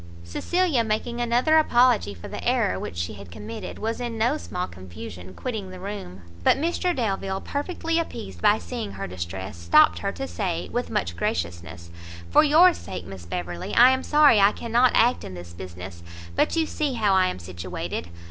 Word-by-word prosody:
Cecilia, 300 - +1
making 230 +2 -2
another 245 +7 +4
apology 240 - +3
for 85 - -9
the - - -7
error 90 0 +1
which 85 - -6
she 85 +3 -2
had 100 -3 -11
committed, 220 - -7
was 225 +3 -3
in 235 -2 -3
no 235 +6 +2
small 180 -11 -4
confusion, 95 - -10
quitting 220 -7 -4
the 185 0 -9
room; 185 - -7 0.2
but - - +5
Mr 345 +3 0
Delvile, 195 -5 -1
perfectly 330 - -2
appeased 95 - -6
by - - +5
seeing 90 +3 -5
her 100 - -5
distress, 90 +1 -6
stopt 85 - +5
her, 200 - -2
to 270 +6 -5
say, 180 -9 -3
with 245 +1 -2
much 85 0 -1
graciousness, 85 0 -4 0.4
"For - - +7
your 325 +4 +6
sake, 95 - -7
Miss 95 -3 -10
Beverley, 90 0 -4
I 250 +2 +8
am 260 0 +1
sorry 295 -7 +5
I 200 +1 +5
cannot 240 +2 +2
act 240 +2 +3
in 95 - -7
this 85 -1 -10
business; 90 0 -9 0.3
but - - +2
you 325 -1 +2
see 300 -3 -2
how 215 -5 +2
I 185 -1 +4
am - - -3
situated! 90 0 -5
190 Hz, 185 wpm, -25 LUFS, -, 0.4 s, I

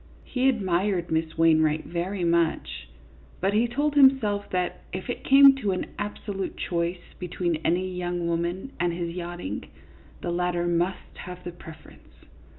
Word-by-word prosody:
He 260 +1 +1
admired 190 -5 0
Miss 160 0 -1
Wainwright 155 -1 +3
very 175 +3 -3
much, 170 -1 0 0.5
but 195 +2 +1
he 225 +3 +3
told 290 +5 0
himself 265 -8 +4
that 180 -1 -2
if 185 +6 -4
it - - -6
came 275 0 +8
to 205 -7 0
an 185 - -4
absolute 205 -1 -4
choice 170 0 -3
between 175 -2 -1
any 175 +4 0
young 175 -1 -3
woman 170 +8 -2
and 175 0 +1
his 170 -1 -3
yachting, 175 - -5 0.6
the 175 - -2
latter 175 0 0
must 175 +2 -1
have 180 0 -8
the 175 - -5
preference. 160 -2 -15
180 Hz, 150 wpm, -26 LUFS, 170-200 Hz, 0.6 s, came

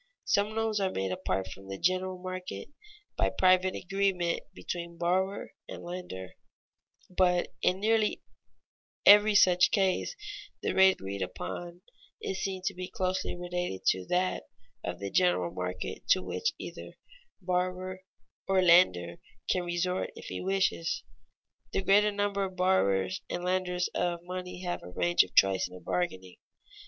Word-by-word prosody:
Some 205 +2 +1
loans 225 -1 0
are 195 -1 +1
made 95 - -2
apart 95 +1 -2
from 95 0 -11
the 95 0 -5
general 185 - 0
market, 185 0 -6 0.5
by - - +2
private 185 0 +3
agreement 190 -2 0
between 170 -1 -6
borrower 190 +3 0 0.2
and - - -8
lender; 175 - -7 0.7
but 180 -1 +2
in 185 +1 +2
nearly 215 +1 +1 0.8
every 210 +1 +8
such 180 -2 +6
case 195 - +1 0.5
the - - 0
rate 190 0 +6
agreed 95 - -6
upon 175 - -5 0.4
is 190 0 -4
seen 190 -1 -3
to 195 - 0
be 180 0 -6
closely 185 -5 -2
related 175 - -4
to 95 0 +1
that 185 +1 0 0.4
of 90 0 -4
the 100 +1 -5
general 175 - +2
market 90 0 -4
to 185 - +4
which 455 0 -1
either - - -8 0.5
borrower 185 0 -2 0.5
or 195 0 +3
lender 90 - +5 0.3
can 180 - +1
resort 175 +1 -1
if - - -10
he - - -4
wishes. 190 -3 0 0.7
The 195 - 0
greater 205 +2 +5
number 200 -1 0
of 190 -1 -7
borrowers 100 - +2
and 175 - -3
lenders 180 -1 0
of 175 -1 -1
money 180 0 -6
have 175 -1 -3
a 90 - -10
range 175 - +3
of - - -3
choice 95 -1 +4
in - - -15
their - - -9
bargaining. 90 0 -3
180 Hz, 145 wpm, -30 LUFS, 170-190 Hz, 0.8 s, every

